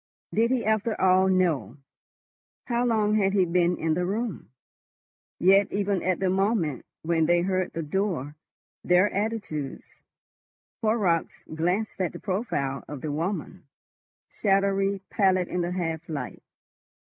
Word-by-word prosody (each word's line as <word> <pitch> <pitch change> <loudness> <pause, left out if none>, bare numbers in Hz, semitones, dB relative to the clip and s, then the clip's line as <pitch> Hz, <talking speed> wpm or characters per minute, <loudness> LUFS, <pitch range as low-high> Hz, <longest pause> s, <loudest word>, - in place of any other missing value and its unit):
Did 230 +2 +3
he 255 -2 0
after 220 +1 0
all 185 0 +4
know? 155 - +1 0.9
How 240 -1 0
long 215 -2 +2
had 195 -2 +2
he 190 -3 +4
been 175 0 +2
in 160 -1 0
the 180 +3 0
room? 205 - -3 0.9
Yet 195 +2 +4
even 200 -2 0
at 185 0 0
the 190 - +1
moment 190 - 0 0.2
when 160 -1 +1
they 175 0 +4
heard 185 0 -1
the 165 - -3
door, 155 -4 -2 0.5
their 180 +3 +3
attitudes.... 200 -9 -4 0.8
Horrocks 210 -7 0
glanced 180 +6 -1
at 180 - -1
the - - -8
profile 185 - -2
of 145 -3 -7
the 155 - -3
woman, 170 +7 -3 0.6
shadowy 195 -1 +1
pallid 185 -3 +2
in 180 - -2
the 175 +1 -2
half 165 -3 -3
light. 140 -6 -5
185 Hz, 135 wpm, -26 LUFS, 165-205 Hz, 0.9 s, all